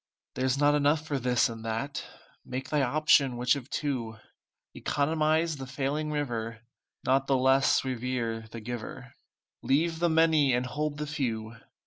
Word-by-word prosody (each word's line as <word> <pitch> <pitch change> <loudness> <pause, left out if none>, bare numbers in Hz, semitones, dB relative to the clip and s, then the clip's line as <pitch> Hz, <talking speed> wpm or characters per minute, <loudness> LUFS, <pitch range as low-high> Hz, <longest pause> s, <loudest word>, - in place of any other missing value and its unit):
There's 130 0 0
not 145 +1 +4
enough 150 +1 +2
for 145 -3 -2
this 125 -1 +2
and 115 -1 -8
that, 115 +5 -3 0.4
Make 130 +1 -5
thy 150 -1 +2
option 140 -1 +3
which 125 +2 +3
of 140 -1 -7
two; 120 -7 -3 0.6
Economize 155 +2 +1
the 135 -1 -7
failing 140 +4 -2
river, 115 -6 -3 0.4
Not 135 +1 +2
the 135 - +3
less 130 +1 +3
revere 120 -3 -2
the 115 0 -8
Giver, 120 0 -7 0.5
Leave 160 +4 +1
the 170 0 +2
many 160 -5 +4
and 125 +1 0
hold 145 +3 -3
the 150 - -3
few. 120 -7 -3
135 Hz, 150 wpm, -28 LUFS, 120-150 Hz, 0.6 s, not